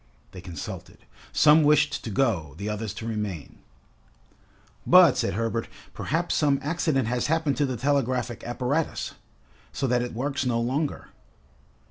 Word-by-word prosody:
They 90 Hz, -, -10 dB
consulted. 85 Hz, -5 st, -8 dB, 0.3 s
Some 155 Hz, +1 st, +6 dB
wished 150 Hz, 0 st, +3 dB
to -, -, -5 dB
go, 95 Hz, -, 0 dB
the 100 Hz, +3 st, -4 dB
others 105 Hz, 0 st, -3 dB
to 110 Hz, -, -7 dB
remain. 105 Hz, -8 st, -5 dB, 1.2 s
"But," -, -, +7 dB
said -, -, -1 dB
Herbert, 115 Hz, +1 st, -1 dB, 0.3 s
"perhaps 165 Hz, +4 st, -1 dB
some 145 Hz, -3 st, +2 dB
accident 150 Hz, -5 st, 0 dB
has 120 Hz, +1 st, 0 dB
happened 155 Hz, -2 st, +1 dB
to 145 Hz, -, +2 dB
the 130 Hz, -2 st, -3 dB
telegraphic 125 Hz, -3 st, 0 dB
apparatus, 130 Hz, +6 st, -2 dB, 0.6 s
so 140 Hz, -, -2 dB
that 125 Hz, -1 st, +2 dB
it 120 Hz, -2 st, -5 dB
works 140 Hz, +3 st, -2 dB
no 120 Hz, -3 st, 0 dB
longer?" 135 Hz, +6 st, -2 dB
125 Hz, 140 wpm, -26 LUFS, 110-145 Hz, 1.2 s, But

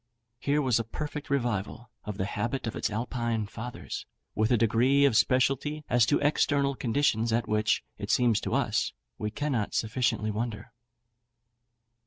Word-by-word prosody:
Here 145 Hz, +4 st, +1 dB
was 125 Hz, -3 st, +3 dB
a -, -, 0 dB
perfect 150 Hz, +5 st, -6 dB
revival 120 Hz, -4 st, -2 dB
of 105 Hz, -2 st, -5 dB
the 95 Hz, -, -1 dB
habit 115 Hz, +6 st, -2 dB
of 115 Hz, -, -3 dB
its -, -, -1 dB
Alpine 115 Hz, 0 st, -2 dB
fathers, 115 Hz, +4 st, -7 dB, 0.3 s
with 110 Hz, +1 st, +1 dB
a 120 Hz, -, +5 dB
degree 120 Hz, +6 st, +4 dB
of 135 Hz, -5 st, +3 dB
specialty 135 Hz, +6 st, +2 dB
as 120 Hz, -2 st, +4 dB
to 145 Hz, -, +4 dB
external 145 Hz, -1 st, +2 dB
conditions 120 Hz, -3 st, +1 dB
at 115 Hz, 0 st, +1 dB
which, 105 Hz, 0 st, +1 dB, 0.2 s
it -, -, -5 dB
seems 120 Hz, -4 st, +3 dB
to -, -, -1 dB
us, -, -, 0 dB, 0.3 s
we 105 Hz, -, -2 dB
cannot 130 Hz, -4 st, -2 dB
sufficiently 110 Hz, -1 st, 0 dB
wonder. 110 Hz, 0 st, -4 dB
120 Hz, 155 wpm, -28 LUFS, 110-135 Hz, 0.3 s, a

